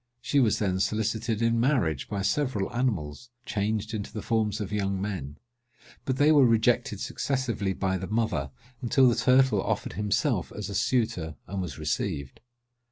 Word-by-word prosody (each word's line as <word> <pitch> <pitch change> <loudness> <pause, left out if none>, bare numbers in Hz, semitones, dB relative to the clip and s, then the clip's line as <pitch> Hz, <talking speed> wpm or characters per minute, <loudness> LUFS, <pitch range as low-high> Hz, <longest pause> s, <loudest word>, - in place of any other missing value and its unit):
She 135 +4 +1
was 115 -6 +3
then 95 -3 0
solicited 110 +2 0
in 115 0 +2
marriage 115 - +1
by 100 -2 -2
several 105 -1 0
animals, 115 - -2 0.2
changed 110 +1 -2
into 105 -2 -4
the 105 - -6
forms 110 -2 0
of 105 -2 -4
young 100 -2 -1
men; 90 -8 -4 0.7
but 130 -1 -1
they 145 +3 +5
were 145 -3 +6
rejected 115 -3 +2
successively 120 -5 -1
by 95 0 -1
the 95 - -5
mother, 110 -11 -1 0.3
until 130 +1 +4
the 120 - +4
turtle 125 -3 +4
offered - - -2
himself 105 +1 0
as 105 -2 -5
a - - -5
suitor, 110 -11 0
and 95 0 -4
was 85 -7 -5
received. 70 -3 -3
105 Hz, 165 wpm, -27 LUFS, 95-120 Hz, 0.7 s, were